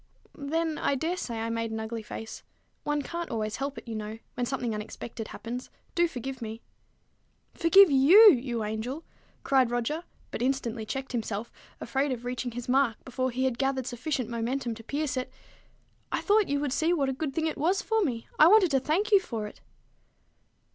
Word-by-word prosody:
"Then, 315 +2 -2
I 280 - +1
dare 325 +6 -1
say 235 -10 -4
I 230 0 -2
made 230 0 -2
an 220 0 -4
ugly 220 +1 -4
face. 220 +1 -8 0.4
One 295 -1 -1
can't 340 +3 -5
always 215 -2 -2
help 275 -1 -3
it, 230 - -9
you 230 - -4
know, 215 0 -5 0.2
when 245 -2 -2
something 245 -3 -2
unexpected 215 +1 -6
happens. 245 +2 -6 0.2
Do 345 0 +3
forgive 265 -3 -6
me." 225 0 -6 0.9
"Forgive 340 +1 +6
you, 355 +11 +9
you 240 -4 -1
angel!" 220 +8 -4 0.4
cried 265 -3 +3
Roger, 245 +7 -1 0.3
but - - -4
instantly 240 -4 -1
checked 270 +2 -4
himself, 225 -2 -3 0.3
afraid 270 +4 -1
of 245 -1 -4
reaching 250 0 -3
his 240 0 -6
mark 255 -3 +2
before 255 0 -1
he 255 +2 -1
had 255 -2 -1
gathered 270 -2 0
sufficient 255 0 -2
momentum 235 +2 -2
to 225 0 -11
pierce 285 +2 -2
it. 255 - -3 0.8
"I - - 0
thought 420 -1 +3
you 285 0 +1
would 285 -3 -1
see 320 +5 +2
what 285 -6 +1
a - - -1
good 275 0 -4
thing 320 - 0
it 315 - -1
was 365 +6 +1
for 445 -1 +1
me. 235 -8 -2
I 310 - +9
wanted 380 -3 +6
to 270 - +4
thank 350 +11 0
you 400 - +8
for 230 - -4
it." 210 - -10
260 Hz, 195 wpm, -28 LUFS, 230-300 Hz, 0.9 s, you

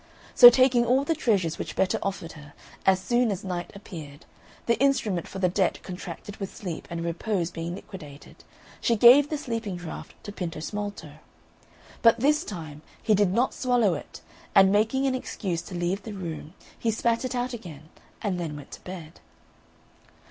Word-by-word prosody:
So 245 - +12
taking 250 0 +4
all 255 +3 +3
the 325 - +1
treasures 200 - 0
which - - -5
Betta 190 - +1
offered 190 -4 -4
her, 145 -2 -13 0.3
as 190 -1 +5
soon 240 +5 +1
as 195 0 -4
Night 180 -2 -4
appeared, 160 -7 -10 0.4
the 235 - +1
instrument 225 -10 +1
for - - -8
the 185 -1 +2
debt 185 +1 +1
contracted 185 +2 -8
with 195 -1 -6
Sleep 180 -6 -6
and 170 -1 -4
Repose 175 +1 -1
being 165 +1 -4
liquidated, 150 -7 -12 0.4
she 235 - +2
gave 250 +6 +7
the 305 - -1
sleeping 230 -8 -4
draught 175 -2 -8
to 205 - -7
Pintosmalto; 205 +3 -5 0.8
but 230 0 +5
this 300 +5 +3
time 155 - -8 0.2
he 215 - +2
did 200 -2 +3
not 240 +7 +1
swallow 245 -7 +2
it, - - -8 0.3
and 195 0 +7
making 220 +6 +2
an 265 - +2
excuse 190 -9 -3
to 180 - -9
leave 175 +3 -1
the 210 +2 -7
room, 165 -3 -7 0.2
he 230 - 0
spat 230 +2 +1
it 255 0 -3
out 245 +1 -2
again, 160 -9 -9 0.3
and 195 -4 -1
then 160 -4 -4
went 145 - -11
to - - -10
bed. 175 -3 -9
195 Hz, 175 wpm, -26 LUFS, 170-235 Hz, 0.8 s, So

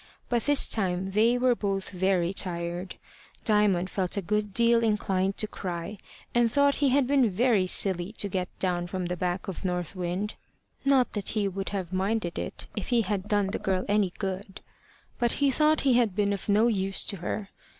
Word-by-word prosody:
By 240 - +2
this 290 +4 +4
time 190 -2 -1
they 225 +5 +3
were 250 0 +3
both 195 -4 -2
very 185 -1 +1
tired. 175 -1 -2 0.5
Diamond 205 -4 +2
felt 185 0 -2
a - - +1
good 210 +2 -1
deal 235 +2 +4
inclined 195 -3 0
to 215 - 0
cry, 185 0 -5 0.3
and 240 -1 +3
thought 280 +1 +3
he 285 -2 +3
had 270 +1 +3
been 265 -3 +3
very 205 -1 +2
silly 180 0 +1
to 210 - -2
get 185 -2 -2
down 175 -2 -1
from 185 0 -3
the 180 +1 -2
back 180 +1 -2
of 190 - -6
North 180 -1 -2
Wind; 185 +3 -3 0.5
not 275 -2 +3
that 205 -3 -2
he 205 -2 +2
would 195 0 -4
have 190 -3 -4
minded 190 -1 -1
it - - -6
if 210 - -4
he 240 -2 +2
had 200 -1 -2
done 205 -2 +1
the - - -3
girl 190 -1 -1
any 205 -3 +2
good; 195 0 -5 0.6
but 240 -1 +2
he 280 -1 +2
thought 305 +3 +3
he 270 -2 +3
had 235 -6 +2
been 205 -1 +1
of 200 - -6
no 210 +3 +4
use 195 -4 0
to 200 - -3
her. 195 +3 -4
200 Hz, 195 wpm, -27 LUFS, 185-225 Hz, 0.6 s, this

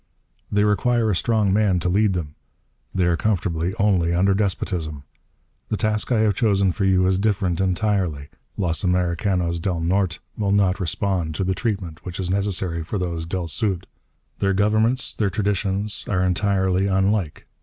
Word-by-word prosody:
They 105 0 +3
require 110 +2 +2
a - - +1
strong 105 0 +1
man 100 -3 +2
to 85 - -1
lead 100 +2 +2
them. 80 -5 -4 0.6
They 95 -2 +1
are 85 -1 +3
comfortable 90 -3 0
only 90 -5 +2
under 95 +2 +3
despotism. 90 -7 -2 0.7
The 110 - -1
task 105 +2 -1
I 115 -3 +3
have 110 -2 +3
chosen 100 -3 +2
for 100 +2 -2
you 95 -1 +3
is 95 0 +2
different, 95 -4 0
entirely. 90 -6 0 0.3
Los 85 -3 0
Americanos 90 -1 0
del 85 0 -1
Norte 90 +1 0 0.2
will 100 -2 0
not 100 -1 +2
respond 90 -2 -1
to 95 - -1
the 95 +1 0
treatment 95 -7 -3
which 90 -1 -6
is 90 -1 -1
necessary 95 -4 -1
for 80 +6 -4
those 85 -3 -3
del 90 0 -3
Sud. 90 +3 -1 0.5
Their 95 0 +1
governments, 110 +5 +2
their 105 -3 0
traditions, 100 +1 -1
are 90 -2 +1
entirely 95 0 +1
unlike. 95 -3 0
95 Hz, 165 wpm, -22 LUFS, 90-105 Hz, 0.7 s, They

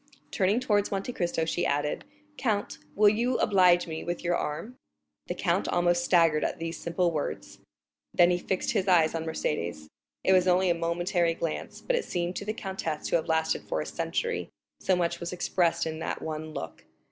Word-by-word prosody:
Turning 200 +4 +2
towards 205 -5 +1
Monte 200 +5 -3
Cristo, 170 -4 -1
she 175 +2 -1
added, 145 +1 -1 0.3
"count, 205 -2 -1 0.2
will 210 +1 +5
you 235 +4 +2
oblige 180 -3 +4
me 160 -2 -5
with 175 0 -4
your 175 0 +1
arm?" 165 +13 -4 0.5
The - - -3
count - - 0
almost 175 0 +2
staggered 165 -4 +4
at - - -1
these 165 0 -5
simple 170 +1 0
words; 150 -3 -4 0.5
then 175 0 +5
he 175 - +1
fixed 185 +1 -1
his 200 -3 0
eyes 165 -4 +4
on 165 -1 -3
Mercédès. 85 - -2 0.4
It 190 - +4
was 185 -1 +4
only 180 0 +4
a - - +4
momentary 170 0 0
glance, 165 -2 -4
but - - 0
it 485 - 0
seemed 175 0 -2
to 200 - -5
the 215 - -1
countess 190 -7 -4
to - - +2
have 160 - -4
lasted 160 0 +1
for - - 0
a - - -2
century, 470 0 -2 0.3
so 185 - +2
much 175 -1 0
was 170 0 -4
expressed 175 -1 +1
in 160 0 -4
that - - -4
one 155 0 -4
look. 80 - -7
175 Hz, 195 wpm, -28 LUFS, 165-190 Hz, 0.5 s, will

